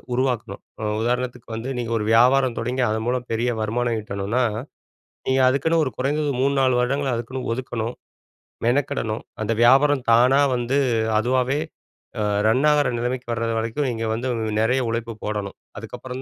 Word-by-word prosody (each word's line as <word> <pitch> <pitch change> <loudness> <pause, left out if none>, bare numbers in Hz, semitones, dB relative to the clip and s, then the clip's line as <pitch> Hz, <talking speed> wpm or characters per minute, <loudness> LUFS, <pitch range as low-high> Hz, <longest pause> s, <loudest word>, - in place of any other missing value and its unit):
உருவாக்கணும். 125 -6 -1 0.2
ம் 105 0 -1
உதாரணத்துக்கு 125 0 -2
வந்து 120 +4 -4
நீங்க 115 -1 -3
ஒரு 105 - -2
வியாபாரம் 125 +1 +4
தொடங்கி 125 +2 -1
அது 110 +1 -1
மூலம் 125 0 -1
பெரிய 120 +2 0
வருமானம் 115 +2 0
ஈட்டனும்னா, 105 +4 -1 0.9
நீங்க 130 0 +3
அதுக்குன்னு 160 +5 +2
ஒரு 130 - -3
குறைந்தது 145 +3 0
3, 140 +1 +2
4 130 -1 +3
வருடங்கள் 135 +1 0
அதுக்குன்னு 125 +2 -5
ஒதுக்கணும், 120 -2 -4 0.7
மெனக்கெடணும். 120 -3 0 0.2
அந்த 110 - -1
வியாபாரம் 135 +2 +5
தானா 125 +4 +5 0.2
வந்து 120 +3 0 0.4
அதுவாவே 130 +4 +1 0.6
அ - - +1 0.2
ரன் 125 +6 +3
ஆகுற 150 -1 +3
நிலைமைக்கு 125 +1 -3
வர்றது 115 0 -1
வரைக்கும் 115 +6 -1
நீங்க 115 -1 -3
வந்து 120 +3 -3 0.3
நெறைய 125 +4 +2
உழைப்பு 115 0 -3
போடணும். 105 -2 -3 0.2
அதுக்கப்புறம் 130 0 -7
125 Hz, 150 wpm, -23 LUFS, 115-130 Hz, 0.9 s, வியாபாரம்